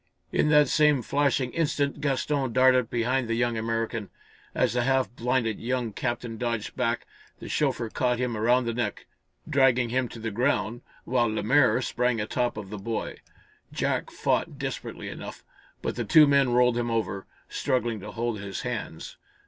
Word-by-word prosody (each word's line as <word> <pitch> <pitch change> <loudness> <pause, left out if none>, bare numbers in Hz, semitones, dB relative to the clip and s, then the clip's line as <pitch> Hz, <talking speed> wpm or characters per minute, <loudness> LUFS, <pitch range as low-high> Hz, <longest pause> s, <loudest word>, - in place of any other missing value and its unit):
In 150 - +2
that 150 -1 +6
same 150 -3 +3
flashing 135 -1 +1
instant 145 -3 0
Gaston 140 -2 0
darted 130 -2 +4
behind 120 +2 0
the 115 - 0
young 120 0 +1
American. 115 -1 -2 0.5
As - - +2
the 125 - +1
half 130 0 +1
blinded 120 -3 0
young 120 -2 -2
captain 120 -1 -3
dodged 115 -3 -2
back, 120 -2 -1 0.3
the - - -8
chauffeur 135 -5 0
caught 125 +2 0
him 125 -1 -1
around 120 +3 +2
the 115 - -1
neck, 120 +1 -3 0.4
dragging 130 -4 +3
him 130 +1 0
to - - -10
the 110 0 -4
ground, 120 0 0 0.2
while 120 -1 +1
Lemaire 125 +5 +3
sprang 125 0 0
a 105 - -1
top 120 0 -1
of 105 -2 -7
the 105 - -5
boy. 115 +3 -4 0.5
Jack - - -1
fought - - -1
desperately - - -5
enough, - - -8 0.4
but - - -2
the - - -2
two 155 -2 +7
men 140 -2 +4
rolled 125 0 +3
him 120 0 -1
over, 110 -4 -2 0.2
struggling 120 -4 -1
to - - -8
hold 115 -2 -3
his 100 -1 -5
hands. - - -5
120 Hz, 170 wpm, -27 LUFS, 115-130 Hz, 0.5 s, two